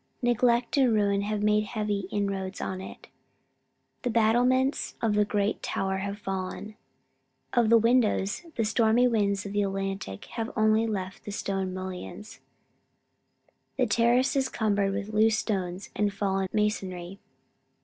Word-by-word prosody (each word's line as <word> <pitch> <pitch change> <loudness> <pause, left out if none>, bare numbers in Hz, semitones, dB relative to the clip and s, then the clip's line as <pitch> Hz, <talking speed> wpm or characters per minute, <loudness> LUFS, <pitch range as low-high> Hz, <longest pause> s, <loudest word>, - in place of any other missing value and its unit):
Neglect 240 +1 +2
and 260 -3 +4
ruin 200 -2 +2
have 210 0 -2
made 210 0 +3
heavy 210 -3 -2
inroads 195 -2 -2
on 185 0 -4
it. - - -10 1.0
The 245 - -1
battlements 245 +4 +2
of 225 -2 +1
the 210 0 +3
great 205 0 -1
tower 190 0 -1
have 200 +1 -4
fallen. 195 +1 -5 0.8
Of 235 -3 +3
the 230 - +7
windows, 230 - +2
the 225 - 0
stormy 225 +2 +3
winds 205 -4 +1
of 200 - -6
the 205 - +2
Atlantic 195 - -3
have 225 -1 -3
left - - -11
only 220 +1 +3
the 195 -1 -4
stone 195 -2 -2
mullions. 185 +2 -7 1.4
The 255 - +3
terrace 240 +4 +2
is 265 -1 +1
cumbered 205 -3 +1
with 200 +1 -3
loose 220 +1 +4
stones 190 -4 -3
and 205 -1 +1
fallen 195 -1 -1
masonry. 195 -3 -2
210 Hz, 140 wpm, -27 LUFS, 195-225 Hz, 1.4 s, the